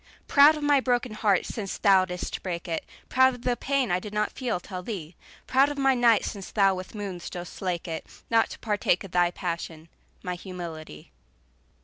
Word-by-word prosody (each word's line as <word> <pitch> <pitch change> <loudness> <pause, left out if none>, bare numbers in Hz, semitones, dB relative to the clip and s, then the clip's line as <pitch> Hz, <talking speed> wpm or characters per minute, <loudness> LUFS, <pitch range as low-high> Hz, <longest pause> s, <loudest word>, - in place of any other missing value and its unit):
Proud 295 +2 +7
of 300 - -6
my 290 -1 +4
broken 245 -2 0
heart 210 -3 +1
since 200 -4 -5
thou 190 -2 +5
didst 180 -1 -5
break 175 -1 -4
it, 165 -1 -2 0.2
Proud 260 0 +4
of 245 - -14
the 245 -1 +1
pain 270 -4 0
I 180 - +2
did 210 +2 -8
not 210 - +1
feel 240 -8 -2
till 185 0 -7
thee, 180 -5 -6 0.3
Proud 270 +2 +4
of 290 - -5
my 270 -1 +4
night 240 -3 +4
since 200 -3 -6
thou 195 -2 +3
with 185 +3 -7
moons 195 -4 -5
dost 175 -1 -7
slake 180 -2 -3
it, 160 -1 -5 0.2
Not 225 -1 +3
to - - -8
partake 205 -4 0
thy 175 -1 +3
passion, 170 -2 -5 0.3
my 180 - -2
humility. 170 - -8
195 Hz, 195 wpm, -26 LUFS, 180-245 Hz, 0.3 s, Proud